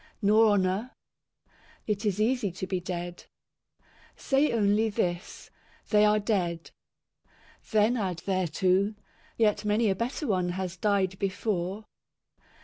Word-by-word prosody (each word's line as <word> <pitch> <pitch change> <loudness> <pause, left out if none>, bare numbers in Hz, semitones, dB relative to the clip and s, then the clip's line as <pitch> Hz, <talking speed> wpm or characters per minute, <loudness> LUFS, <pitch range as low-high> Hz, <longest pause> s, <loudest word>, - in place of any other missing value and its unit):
Nor 215 +1 +5
honour. 195 +4 0 1.0
It 210 0 -2
is 205 0 -1
easy 220 -2 +1
to 190 - -5
be 185 -1 -2
dead. 175 -1 -6 0.9
Say 275 +2 +1
only 215 0 +2
this, 175 -2 -3 0.2
" - - -31
They 210 -1 +5
are 210 0 +4
dead." 185 -6 -1 1.0
Then 220 +3 +3
add 185 -6 -2
thereto, 185 +2 +1 0.2
" - - -31
Yet 215 -2 +2
many 210 0 +2
a - - 0
better 245 - -3
one 185 -6 0
has 190 -1 -3
died 190 0 0
before." 195 0 -2
200 Hz, 130 wpm, -28 LUFS, 185-215 Hz, 1.0 s, Nor